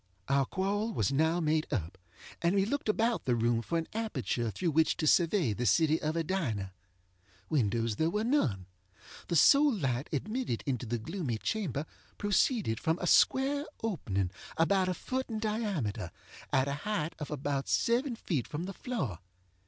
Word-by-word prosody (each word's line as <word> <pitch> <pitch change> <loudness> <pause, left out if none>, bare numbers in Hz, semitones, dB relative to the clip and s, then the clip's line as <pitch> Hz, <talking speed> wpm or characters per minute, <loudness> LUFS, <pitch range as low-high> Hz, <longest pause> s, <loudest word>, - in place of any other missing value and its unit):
Our 135 -1 +2
quarrel 205 +4 -1
was 110 - +1
now 160 +5 +2
made 155 -1 0
up, 95 - -2 0.5
and 170 +3 +2
we 195 -1 +3
looked 275 +1 -2
about 225 +2 +1
the 125 - +2
room 115 0 +1
for 165 +9 -2
an 165 - -2
aperture 130 - -2
through 170 - -1
which 160 +2 +3
to 155 - -1
survey 165 - +3
the 120 +3 -1
city 155 - +3
of 155 +1 -1
Edina. 135 - -2 0.8
Windows 115 -5 +1
there 160 +1 +2
were 210 +5 -1
none. 180 - +1 0.6
The 170 - -1
sole 285 - +6
light 135 - -1
admitted 215 - -2
into 125 -3 -2
the 120 +2 -1
gloomy 140 - -3
chamber 155 - -2 0.3
proceeded 205 - +1
from 160 +1 0
a 180 - -4
square 275 +9 +4 0.2
opening, 100 - -1 0.3
about 185 +3 +3
a 180 - -1
foot 260 +8 -3
in 225 - -3
diameter, 200 - -2 0.4
at 130 0 +3
a 140 - -1
height 170 -7 -2
of 150 - -5
about 140 -1 -2
seven 240 +2 +1
feet 155 - -2
from 150 +3 -4
the 195 +2 -5
floor. 155 - -3
160 Hz, 170 wpm, -31 LUFS, -, 0.8 s, sole